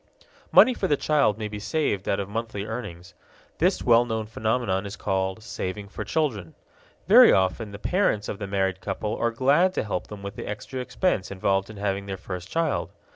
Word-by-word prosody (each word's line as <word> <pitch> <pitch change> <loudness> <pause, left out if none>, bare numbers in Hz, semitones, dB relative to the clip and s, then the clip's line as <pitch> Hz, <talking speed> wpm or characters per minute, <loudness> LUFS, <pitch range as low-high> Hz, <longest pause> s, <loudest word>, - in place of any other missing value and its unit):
Money 255 - +7
for 195 - -2
the 145 - +2
child 140 -10 +2
may 110 -1 -3
be 105 0 -6
saved 105 - -1
out 100 - +1
of 100 - -3
monthly 105 -1 -4
earnings. 90 -7 -7 0.5
This - - +2
well 120 -1 +5
known 110 -2 -3
phenomenon 110 -2 -1
is 100 - -7
called 95 +1 -2
saving 100 -2 -5
for - - -5
children. 115 - -2 0.5
Very - - +9
often 95 +3 +1
the 100 - -7
parents 145 - 0
of 100 - -5
the 100 - -4
married 95 -1 -1
couple 105 +2 -3
are 115 - 0
glad 140 +10 +3
to - - 0
help 105 -4 -3
them 105 -2 -9
with 100 +1 -6
the - - -7
extra 105 +5 -5
expense 125 - -1
involved 95 +1 0
in 110 - -10
having 100 0 -2
their 95 -1 -4
first 90 0 -7
child. 165 +1 -1
105 Hz, 195 wpm, -25 LUFS, 95-120 Hz, 0.5 s, Very